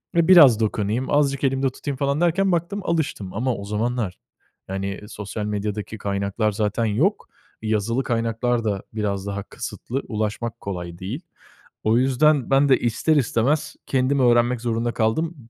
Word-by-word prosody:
ve 170 0 +3
biraz 145 -12 +8
dokunayım, 110 +3 -1
azıcık 140 -2 +2
elimde 135 0 +2
tutayım 135 +1 -5
falan 140 +3 0
derken 190 +3 +2
baktım 175 +4 -1
alıştım 145 - -2
ama 125 +3 -1
o 100 - -7
zamanlar 105 -2 -2 0.5
yani 95 +1 -3
sosyal 105 0 -5
medyadaki 105 +1 -3
kaynaklar 100 +2 -1
zaten 105 +2 -1
yok. 150 - +1 0.4
Yazılı 110 +4 0
kaynaklar 115 0 0
da 100 -3 -2
biraz 100 -2 -2
daha 100 0 -3
kısıtlı, 135 +3 -5
ulaşmak 110 +1 -3
kolay 90 -3 -6
değil. 110 - -5 0.6
O 110 +2 +4
yüzden 135 +1 +3
ben 135 +1 +4
de 130 - +5
ister 120 +7 +1
istemez 135 +3 +1
kendim 135 +1 +1
öğrenmek 120 0 +3
zorunda 120 0 -1
kaldım 160 +10 0
115 Hz, 145 wpm, -23 LUFS, 105-135 Hz, 0.6 s, biraz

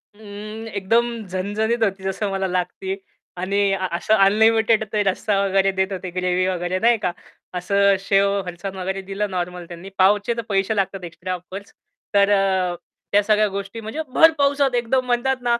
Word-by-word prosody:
उम्म, 215 +1 -8
एकदम 225 +3 +1 0.2
झणझणीत 210 +5 -1
होती 195 -2 -1
जसं 190 +2 -2
मला 195 0 -1
लागती. 185 +1 -2 0.4
आणि 195 +2 -1 0.2
अ 190 -1 -1
असं 195 +5 +1
अनलिमिटेड 220 +2 +4
ते 210 - +2
रस्सा 195 +1 0
वगैरे 195 0 +2
देत 190 +1 -1
होते, 185 -1 -5
ग्रेव्ही 180 0 0
वगैरे, 180 0 -1
नाही 235 +3 +4
का? 180 - 0 0.5
असं 200 +2 +3
शेव, 200 0 +2
फरसान 180 +2 -6
वगैरे 190 +1 -3
दिलं 195 +2 -3
नॉर्मल 180 -1 -4
त्यांनी. 175 +2 -9
पावचे 205 +4 +3
तर - - -1
पैसे 195 +2 +1
लागतात 195 -2 -1
एक्स्ट्रा 175 +2 -5
ऑफकोर्स. 185 +3 -8 0.4
तर 200 0 +4
अ, 190 -3 +2 0.4
त्या 205 - +5
सगळ्या 215 0 +3
गोष्टी 200 +3 -6
म्हणजे 220 +9 -4
भर 325 0 +7
पावसात 280 -2 +2
एकदम 245 +2 +1
म्हणतात 250 +2 +1
ना, 240 -1 +2
195 Hz, 170 wpm, -22 LUFS, 185-220 Hz, 0.5 s, भर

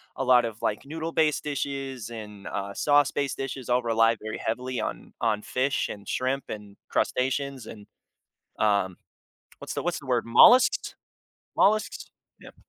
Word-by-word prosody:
a - - -2
lot 125 -2 +5
of, 115 -1 -6
like, 105 - -2
noodle-based 160 0 0
dishes 135 -4 -4
and, 105 -3 -9
uh, 100 0 -4
sauce-based 145 -1 +2
dishes 135 -2 -5
all 125 +1 +3
rely 115 -1 +3
very 110 0 -5
heavily 125 +2 -3
on - - -5
on 110 -2 +1
fish, 130 +5 -1
and 100 -1 -8
shrimp, 130 +2 -1
and 105 -2 -8
crustaceans, 135 -1 -1
and, 105 -2 -11 0.7
um, 100 -4 +1 0.6
what's - - -6
the - - -2
what's 175 0 -1
the 140 - -13
word- 125 -2 +1
mollusks? 240 - +6 0.6
Mollusks? 215 +2 +1 0.3
Yep. - - -13
125 Hz, 145 wpm, -26 LUFS, 110-140 Hz, 0.7 s, mollusks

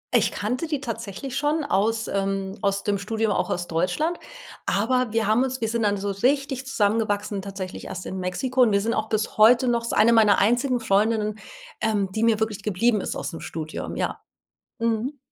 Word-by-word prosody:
Ich - - +3
kannte 250 +10 -2
die 300 -3 -1
tatsächlich 230 0 -6
schon 295 +2 +1
aus 225 -3 0
ähm, 195 0 -2
aus 200 0 0
dem 205 -1 0
Studium, 220 +1 -1
auch - - 0
aus 175 0 -2
Deutschland, 300 - 0 0.5
aber 250 +3 +1
wir 225 0 +1
haben 220 +5 +3
uns 260 -1 -3
wir 225 - -1
sind 235 +1 -1
dann 205 -1 +2
so 200 +1 -2
richtig 270 +5 0
zusammengewachsen 205 -3 0
tatsächlich 190 -1 -7
erst 180 - -6
in 190 - -5
Mexiko. 255 +8 -1
Und 240 -3 +5
wir 200 0 +3
sind 225 +3 0
auch 220 0 -2
bis 215 0 -1
heute 235 +4 +6
noch 240 -1 +2
das 230 - -6
ist - - -2
eine 225 +3 +6
meiner 215 -3 +5
einzigen 245 +4 +2
Freundinnen, 215 0 +1 0.4
ähm, 210 -3 +1
die 220 +3 -1
mir 225 -2 +3
wirklich 220 -2 -2
geblieben 210 +2 +1
ist - - -4
aus - - -4
'm 165 - -6
Studium, 155 -1 -6
ja. - - -2 0.6
Mhm. 230 +5 -1
220 Hz, 200 wpm, -24 LUFS, 200-240 Hz, 0.6 s, heute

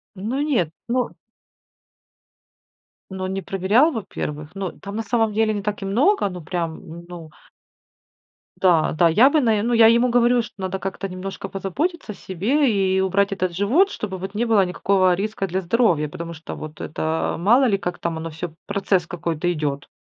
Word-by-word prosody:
Ну 225 +9 -2
нет, 255 - +1 0.2
ну 250 0 0 2.0
Но 190 0 -4
не 190 +1 -3
проверял, 200 - +3
во-первых. 155 - -5
Ну, 195 -3 -4
там 200 +1 -9
на 225 - -2
самом 220 0 +1
деле 215 0 +2
не 205 - -4
так 210 0 -3
и - - -4
много, 245 - +2
ну 180 -3 -8
прям, 165 -1 -3
м, 170 +2 -11
ну 170 -3 -10 1.3
Да, 170 -4 +4
да, 170 +2 +3
я 220 +11 +6
бы 310 - +3
наверное, 220 -3 +2
ну - - +1
я 225 -1 +7
ему 235 +2 +4
говорю, 245 0 +4
что 225 - -10
надо 190 0 -3
как-то 195 +1 -4
немножко 185 +1 -6
позаботиться 250 - -3
о 205 - -9
себе 245 - 0
и 190 -2 +1
убрать 195 +1 +1
этот 185 -3 -2
живот, 255 - +3
чтобы 195 - -5
вот 190 +2 -6
не 230 - +1
было 215 -4 +4
никакого 185 +1 +2
риска 195 +1 -2
для 190 +2 -2
здоровья. 175 -6 +2
Потому 170 +3 -7
что 160 0 -8
вот 155 0 -9
это, 160 +1 -2
мало 235 +10 +4
ли, 205 -5 +2
как 175 -2 -4
там 165 -1 -2
оно 165 +1 -5
всё, 160 +2 -6 0.2
процесс 195 -3 0
какой-то 175 -1 -2
идёт. 145 -4 -3
195 Hz, 185 wpm, -22 LUFS, 175-225 Hz, 2.0 s, я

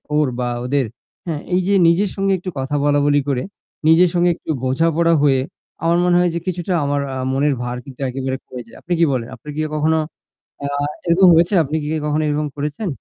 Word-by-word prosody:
ওর 150 -2 +3
বা 125 - -1 0.2
ওদের? 135 0 +1 0.4
হ্যাঁ 155 -3 -3
এই 185 - +3
যে 200 - +2
নিজের 185 +4 +3
সঙ্গে 195 0 0
একটু 185 +1 -6
কথা 135 +2 -2
বলাবলি 145 0 +3
করে 125 -2 0 0.4
নিজের 170 +2 +6
সঙ্গে 175 0 +3
একটু - - -5
বোঝাপড়া 165 +5 +2
হয়ে 135 -2 +4 0.4
আমার 170 +1 +3
মনে 175 0 +3
হয় 180 -1 +3
যে - - 0
কিছুটা 180 0 -2
আমার 145 0 0
আ - - -3 0.2
মনের 140 +1 +2
ভার 120 0 -3 0.3
একেবারে 130 0 -3
কমে 125 -1 -8
যায়। - - -16
আপনি 175 - -2
কি 165 - +5
বলেন? 120 -2 -2
আপনি - - -21
কি - - -4
ইয়ে 155 - -2
কখনো 160 +1 +2 0.7
আ - - -2 0.4
এরকম 175 +2 +5
হয়েছে? 170 +5 +3
আপনি 150 +3 -4
কি - - -4 0.2
কখনো 150 +1 0
এরকম 150 0 -1
করেছেন? 150 +8 -3
150 Hz, 205 wpm, -19 LUFS, 140-170 Hz, 0.7 s, নিজের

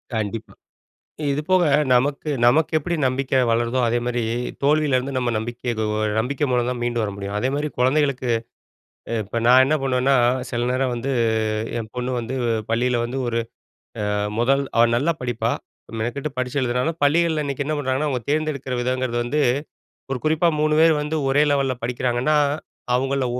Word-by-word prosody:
கண்டிப்பா. 110 0 -4 0.8
இது 140 - 0
போக 185 -1 +4 0.3
நமக்கு 140 +4 +1
நமக்கு 150 +7 +4
எப்படி 170 +3 -3
நம்பிக்கை 130 +1 +1
வளருதோ 120 +2 +1
அதேமாரி, 120 0 -1 0.4
தோல்வியிலிருந்து 140 -2 +2
நம்ம 125 -2 0
நம்பிக்கை 120 +3 -5
எதோ 110 -1 -2 0.3
நம்பிக்கை 140 +5 0
மூலம் 125 -1 +1
தான் 125 -1 -4
மீண்டும் 120 -1 0
வர 100 - -2
முடியும். 100 0 -5
அதேமாதிரி 140 +6 -1
குழந்தைகளுக்கு 130 -1 +1 0.9
இப்ப 115 +4 -3
நா 125 - +7
என்ன 150 +4 +2
பண்ணுவேன்னா, 130 0 +2 0.4
சில 120 0 -1
நேரம் 130 0 0
வந்து 130 +3 -3 0.7
என் 110 -1 -6
பொண்ணு 125 +1 -2
வந்து 125 +3 -4 0.3
பள்ளியில 120 +1 +1
வந்து 130 +3 -3
ஒரு 115 0 0 0.7
அ - - 0 0.3
முதல் 135 +4 +3
அவ 115 - +7
நல்லா 150 +7 +1
படிப்பா. 120 -2 -1 0.5
மெனக்கெட்டு 135 +6 -3
படிச்சு 130 +2 -1
எழுதுனாலும், 125 +7 -1
பள்ளிகள்ல 160 +1 +2
இன்னைக்கு 140 0 -3
என்ன 155 +1 -1
பண்ணுறாங்கன்னா, 140 +2 0
அவங்க 125 -3 -2
தேர்ந்தெடுக்குற 145 -4 -1
விதங்கிறது 125 -1 -1
வந்து 145 +5 0 0.7
ஒரு 125 - -1
குறிப்பா 160 +2 +3
3 155 0 +2
பேர் 160 -2 +5
வந்து 150 +2 -2
ஒரே 145 +2 +4
லெவலல்ல 135 -2 +1
படிக்கிறாங்கன்னா, 125 +4 +1 0.6
அவங்கள 135 +1 0
130 Hz, 150 wpm, -22 LUFS, 120-145 Hz, 0.9 s, நா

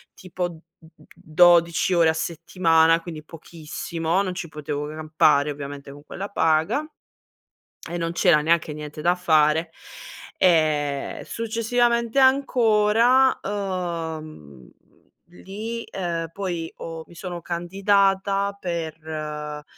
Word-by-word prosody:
tipo 180 -1 -4
d 165 -2 -12 0.2
d 160 -1 -20
12 170 +2 +3
ore 165 -2 +4
a - - +2
settimana, 165 0 +2
quindi 160 -3 -8
pochissimo, 165 +2 -4
non 185 -2 -3
ci 175 -2 -6
potevo 150 -1 -5
campare 155 -2 +2
ovviamente 140 -1 -8
con 145 0 -14
quella 195 +5 -6
paga 160 - +1 1.1
e 175 - -3
non 165 0 -2
c'era 170 -4 +4
neanche 160 0 +1
niente 150 0 -8
da 175 +2 +3
fare 160 -2 +2 0.7
e 155 -5 +1
successivamente 235 +2 0
ancora, 250 -1 +4
mhmm, 165 - -5 0.6
lì, 215 +6 -7
ehm, 170 -3 -4
poi 175 -4 -4
ho 165 -1 -7
mi - - -16
sono 175 0 -7
candidata 195 +3 +1
per, 170 -4 -4
ehm, 150 -1 -5
170 Hz, 110 wpm, -23 LUFS, 155-195 Hz, 1.1 s, ore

